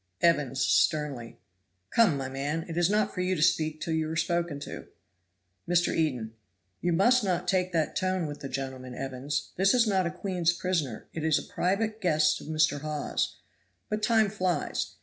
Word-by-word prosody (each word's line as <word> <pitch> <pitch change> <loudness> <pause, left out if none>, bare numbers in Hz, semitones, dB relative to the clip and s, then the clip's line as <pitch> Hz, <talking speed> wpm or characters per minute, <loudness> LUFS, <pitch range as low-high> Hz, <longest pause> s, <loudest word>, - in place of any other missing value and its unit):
Evans 145 -6 +2
(sternly). 140 -8 +1 0.5
"Come, 215 -11 +4
my 135 -1 -3
man, 145 +5 -3
it 165 - -6
is 175 +1 +3
not 210 0 +1
for 180 - -2
you 185 +1 +1
to 155 - -3
speak 155 -1 +2
till 165 - -2
you 160 -1 0
are 160 - -3
spoken 170 -2 -1
to." - - -7 0.8
Mr. 175 0 +2
Eden. 125 -9 -1 0.5
"You 175 - +1
must 235 +8 +4
not 180 -2 -1
take 185 -1 +1
that 160 -2 0
tone 185 -2 0
with 145 -1 -6
the 135 - -6
gentleman, 130 -1 -5
Evans 135 +2 -4
this 195 +6 +4
is 240 -2 +5
not 190 -4 +2
a - - -1
queen's 175 -1 0
prisoner, 170 -10 -2
it 160 - -4
is 160 -2 +3
a - - -3
private 215 +4 0
guest 155 -5 +2
of - - -11
Mr. 155 -2 +1
Hawes. 150 -1 -2 0.5
But 210 0 -2
time 220 -2 +3
flies. 185 -6 -1
165 Hz, 185 wpm, -28 LUFS, 145-185 Hz, 0.8 s, is